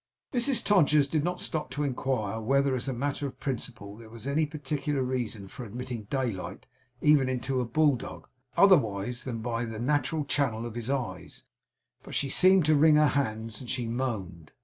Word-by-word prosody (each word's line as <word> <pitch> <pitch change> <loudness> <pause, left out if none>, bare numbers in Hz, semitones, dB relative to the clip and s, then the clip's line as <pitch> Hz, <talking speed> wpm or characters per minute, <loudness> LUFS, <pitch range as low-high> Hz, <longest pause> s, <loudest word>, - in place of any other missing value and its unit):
Mrs 250 +1 +1
Todgers 150 -8 +4
did 150 0 0
not 180 +1 -1
stop 155 -6 -3
to 145 +3 -3
inquire 125 -6 -1
whether, 135 +4 +2
as 130 +2 -3
a - - 0
matter 140 +3 -2
of 130 - -10
principle, 115 -6 -5
there 115 -1 -12
was 115 +1 -11
any 150 +3 +1
particular 145 -1 -2
reason 120 -6 -3
for 125 - -8
admitting 120 0 -6
daylight 100 -8 -3 0.4
even 150 -3 +5
into 130 +1 -1
a - - -1
bulldog, 140 +1 0 0.3
otherwise 125 - +3
than 115 -4 -4
by 115 0 -1
the 115 -2 -5
natural 145 +4 0
channel 125 -6 0
of 120 - -6
his 120 +1 -5
eyes, 135 -4 -4 0.6
but - - -9
she 140 - 0
seemed 185 +3 +5
to 155 - +4
wring 150 +1 +6
her 150 -1 +5
hands, 110 -5 -2
and 125 - -9
she 130 -3 -2
moaned. 110 - -4
130 Hz, 180 wpm, -28 LUFS, 115-145 Hz, 0.6 s, wring